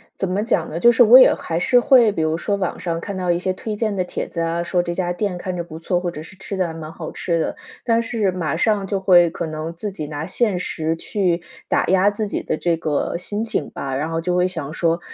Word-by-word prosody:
怎 190 - -2
么 200 +3 0
讲 225 - 0
呢， 160 - -4
就 240 +7 +6
是 240 - +2
我 235 +3 +9
也 255 - +7
还 165 0 -3
是 245 +7 +4
会 245 -4 +5
比 165 - -2
如 160 +1 0
说 200 +3 -1
网 190 -3 -3
上 165 -2 -2
看 200 +2 -6
到 180 -1 0
一 170 - +1
些 185 +1 -1
推 215 +3 -5
荐 215 -1 -1
的 185 - 0
帖 - - -5
子 170 - -4
啊， 165 +1 -1
说 175 +1 +1
这 175 - -3
家 175 -1 -1
店 180 -1 -2
看 180 0 -4
着 170 - -3
不 160 -1 -10
错， 175 +2 0
或 175 -1 -3
者 155 - -8
是 165 - -11
吃 195 0 -6
的 185 -2 +1
还 160 - -6
蛮 160 -1 -8
好 165 -1 -7
吃 170 -2 -1
的， - - -2 0.3
但 230 -1 +2
是 225 -4 0
马 165 -4 -2
上 205 +2 +1
就 195 0 -2
会 175 -3 +5
可 165 - -4
能 155 +1 -5
自 205 +4 -5
己 155 -6 -6
拿 150 +1 -5
现 215 -6 +1
实 160 -2 -2
去 180 -1 -1 0.3
打 - - +1
压 190 +2 +4
自 210 +1 -3
己 - - -3
的 155 - -2
这 170 0 +1
个 155 0 -1
心 205 +5 -2
情 190 -10 -2
吧。 135 -1 -4
然 150 +4 -2
后 165 - -1
就 180 +1 -1
会 180 0 +3
想 160 -5 -4
说： 165 +1 +1
180 Hz, 295 characters per minute, -21 LUFS, 165-200 Hz, 0.3 s, 我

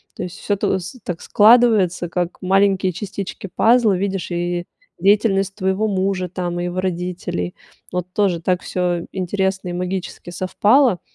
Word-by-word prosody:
То - - -5
есть 180 +3 -7
всё 205 - 0
тос 190 +1 -2
так 175 -4 -5
складывается, 210 -6 +4
как 175 0 -3
маленькие 190 0 +2
частички 200 +1 -6
пазла, 225 -1 +4
видишь, 195 -2 -3
и 175 0 -2 0.3
деятельность 195 -1 +2
твоего 190 +2 0
мужа 190 -2 0
там 175 -1 -3
и 175 - -2
его 180 +1 -2
родителей. 175 - -3 0.4
Вот 180 0 -2
тоже 190 -5 +1
так 180 +1 0
всё 175 -2 -1
интересно 190 0 -1
и - - -4
магически 180 0 -4
совпало. 210 +4 +3
185 Hz, 145 wpm, -20 LUFS, 180-200 Hz, 0.4 s, складывается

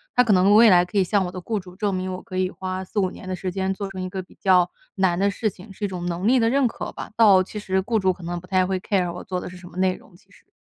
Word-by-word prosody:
它 250 - +6
可 220 -4 +3
能 190 +2 +5
未 225 +1 +8
来 175 -1 +6
可 180 +3 -5
以 195 - +5
向 195 +1 +1
我 180 - -5
的 185 - -6
雇 215 +3 -2
主 180 -1 -13
证 205 0 -1
明， 185 0 -2
我 185 - -6
可 185 - -7
以 185 0 +1
花 185 0 -5
4-5 190 -1 -1
年 - - -11
的 185 - -2
时 185 0 -4
间 190 +1 -1
做 200 0 -5
成 190 -1 -6
一 185 - -4
个 190 0 -4
比 180 - -18
较 180 -2 +4 0.3
难 190 -3 +2
的 200 - +3
事 215 +1 -1
情， 195 +2 -14
是 205 - -4
一 - - 0
种 180 -2 -5
能 175 +3 -2
力 255 +2 +5
的 225 -1 +3
认 270 0 +3
可 225 - -6
吧。 - - -8
倒 210 -5 +6
其 210 - -9
实 190 -2 0
雇 225 +2 0
主 190 -1 +2
可 175 - -14
能 175 +1 -4
不 180 - -15
太 185 -1 +2
会 190 0 -1
care 185 -2 0
我 175 - -8
做 185 -1 -3
的 - - -6
是 180 - -11
什 180 - -12
么 175 - -13
内 185 0 +2
容， - - -18
其 205 - -24
实。 - - -22
185 Hz, 370 characters per minute, -23 LUFS, 180-200 Hz, 0.3 s, 未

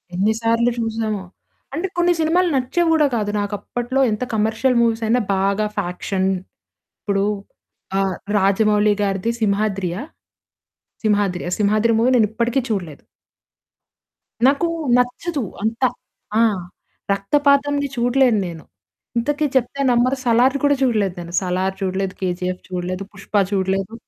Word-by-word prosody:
ఎన్ని 200 +4 +2
సార్లు 230 +1 +2
చూసామో! 220 -3 -2 0.5
అంటే 335 +6 -1
కొన్ని 350 0 +4
సినిమాలు 345 +3 +2
నచ్చేవి 325 +7 +1
గూడా 305 -2 +4
కాదు. 210 -2 -1
నాకప్పట్లో 240 +6 -2
ఎంత 215 +3 -2
కమర్షియల్ 220 +4 +1
మూవీస్ 230 -1 +1
అయినా 245 +3 +3
బాగా 200 +2 +1
ఫ్యాక్షన్ 190 0 -1 0.7
ఇప్పుడు 200 -1 0 0.8
ఆహ్, 190 -2 0 0.2
'రాజమౌళి' 210 +1 +3
గారిది 195 +2 0
'సింహాద్రియా'. 200 -2 0 1.0
'సింహాద్రి'. 205 -5 +1
'సింహాద్రి' 215 +2 +2
మూవీ 235 +3 +3
నేనిప్పటికి 235 +3 +1
చూడలేదు. 180 -9 -4 1.5
నాకు 280 +5 +2 0.3
నచ్చదు. 275 +5 -1 0.2
అంత 225 +2 -2 0.6
ఆ! - - +5 0.7
రక్తపాతంది 285 +6 +2
చూడలేన్నేను. 235 -9 +1 0.5
ఇంతకి 295 +5 0
చెప్తే 260 +2 +1
నమ్మరు 250 +3 +2
'సలార్' 245 +2 +3
కూడా 285 0 +4
చూడలేదు. 215 -7 +1
నేను 170 0 -9
'సలార్' 185 +1 -1
చూడలేదు. 190 0 -1
'కేజీఎఫ్' 180 0 -2
చూడలేదు. 185 +1 -3
'పుష్ప' 205 +1 0
చూడలేదు. 195 +1 -1
215 Hz, 110 wpm, -20 LUFS, 195-250 Hz, 1.5 s, ఆ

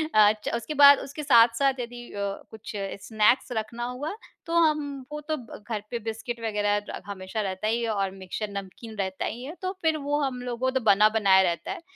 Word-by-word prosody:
अ, 210 -1 +7
च - - -1
उसके 235 +6 -4
बाद 280 0 +10
उसके 285 +2 -7
साथ-साथ 255 +1 +5
यदि 240 0 -6
अ, 200 - -4 0.3
कुछ 225 +2 -9 0.4
स्नैक्स 220 +4 +3
रखना 230 +1 -3
हुआ 250 +9 -4 0.3
तो 330 - -4
हम 300 -5 +1
वो 300 - -4
तो 310 - +2 0.2
घर 210 0 -4
पे 235 - -2
बिस्किट 225 +2 -5
वग़ैरह 205 -2 -1
हमेशा 200 +1 -4
रहता 190 +1 -3
ही 230 +2 +1
है 230 - -1
और 195 -3 0
मिक्सचर 195 +2 -5
नमकीन 200 +3 -7
रहता 190 -1 -2
ही 240 +3 -5
है, 300 +6 -7
तो 370 - -1
फिर 320 -1 +2
वो 290 0 -1
हम 260 -3 -2
लोगों 245 -1 -3
वो - - +2
तो 260 - +1
बना 210 +1 +6
बनाया 200 -3 +5
रहता 175 -2 -1
है। - - -6
230 Hz, 205 wpm, -26 LUFS, 205-265 Hz, 0.4 s, बाद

